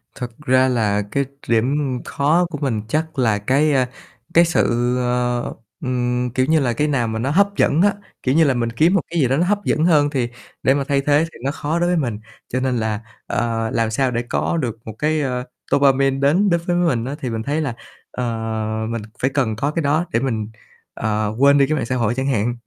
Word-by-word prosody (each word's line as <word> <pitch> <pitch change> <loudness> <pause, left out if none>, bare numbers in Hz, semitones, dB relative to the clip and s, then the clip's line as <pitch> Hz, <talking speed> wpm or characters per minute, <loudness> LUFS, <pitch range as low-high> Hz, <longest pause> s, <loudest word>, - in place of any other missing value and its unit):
Thật 125 -2 -5
ra 130 -1 +4
là 110 -5 +1
cái 140 0 0 0.2
điểm 120 +4 +2 0.3
khó 155 +5 +2
của 160 - -5
mình 120 -7 0
chắc 155 +2 -2
là 110 -5 +3
cái, 140 +8 +2
a, 130 -2 +2 0.4
cái 170 +1 +6
sự, 120 -7 +1
ờ, 125 -1 -1 0.3
ừm, 125 -1 -1
kiểu 130 - +3
như 160 +3 +3
là, 125 -4 +1
cái 150 +6 0
nào 130 -6 0
mà 110 0 -3
nó 130 +5 -1
hấp 200 +5 +3
dẫn 155 - +3
á, 205 +1 +4 0.3
kiểu 130 +1 +1
như 165 - +6
là, 140 -4 +3
mình 120 -2 -1
kiếm 155 +10 +3
một 195 - +3
cái 170 - 0
gì 135 - +3
đó 135 +3 +1
nó 170 - +2
hấp 205 +2 +1
dẫn 155 +2 +2
hơn 150 -4 +4
thì 130 -5 -1 0.3
để 135 - +4
mà 140 0 0
thay 140 -1 +2
thế 145 +2 +3
thì - - -14
nó 140 - +1
khó 150 +3 -2
đối 175 0 +1
với 180 - +2
mình. 120 -9 -2 0.3
Cho 130 - -1
nên 130 -1 0
là, 110 -2 -1 0.3
ờ, 115 -1 -1
làm 115 -1 +1
sao 130 +3 +1
để 120 -1 -1
có 170 - 0
được 120 -8 -2
một 110 - -6
cái, 155 +1 +1
ơ, 125 -3 -2 0.3
dopamine 135 -1 +3
đến 165 +9 +3
đến 170 -1 +2
với 175 - +1
mình 165 -10 +1
á, 135 +3 -4
thì 130 -4 -3
mình 110 -1 -3
thấy 145 +5 -1
là, 140 -6 -2 0.4
ờ, 125 - -4 0.7
mình 115 -1 -3 0.2
phải 135 - +2
cần 120 -6 0
có 140 +7 -1
cái 165 - -1
đó 150 +4 +1
để 115 - +3
mình, 115 -5 -2 0.4
ờ, 110 -1 -1
quên 140 +1 +6
đi 140 - +5
cái 155 - 0
mạng 130 - -1
xã 125 - -2
hội 115 -3 +1
chẳng 130 +1 -1
hạn. 120 -2 0
130 Hz, 240 wpm, -20 LUFS, 120-150 Hz, 0.7 s, cái